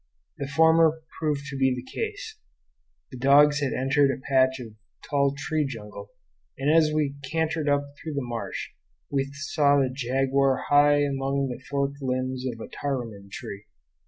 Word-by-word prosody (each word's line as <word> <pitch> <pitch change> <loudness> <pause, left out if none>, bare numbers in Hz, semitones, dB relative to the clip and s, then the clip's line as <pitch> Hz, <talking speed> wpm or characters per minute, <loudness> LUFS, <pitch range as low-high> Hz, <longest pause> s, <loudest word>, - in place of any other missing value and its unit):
The 140 - -3
former 160 +2 +4 0.2
proved 150 -3 -1
to - - -5
be 130 -1 +2
the 125 - -6
case. 430 - -6 0.7
The 130 - -9
dogs 145 +2 +5
had 140 -2 -1
entered 135 +2 +2
a 135 - -2
patch 130 -1 +3
of 115 -4 -9 0.3
tall 140 -1 +1
tree 155 +2 -1
jungle, 110 -7 -7 0.5
and 140 +3 +2
as 155 -2 +4
we 150 -2 -1
cantered 160 -1 0
up 145 0 +2
through 155 -2 -6
the 140 - -1
marsh 115 -5 -5 0.4
we 135 -1 0
saw 140 0 +2
the 135 -2 +2
jaguar 135 +1 +1
high 145 0 +5
among 135 -1 -1
the 125 0 -6
forked 140 0 -2
limbs 130 0 -2
of 115 - -11
a - - -7
taruman 115 -8 -5
tree. 100 +1 -8
140 Hz, 160 wpm, -26 LUFS, 130-145 Hz, 0.7 s, dogs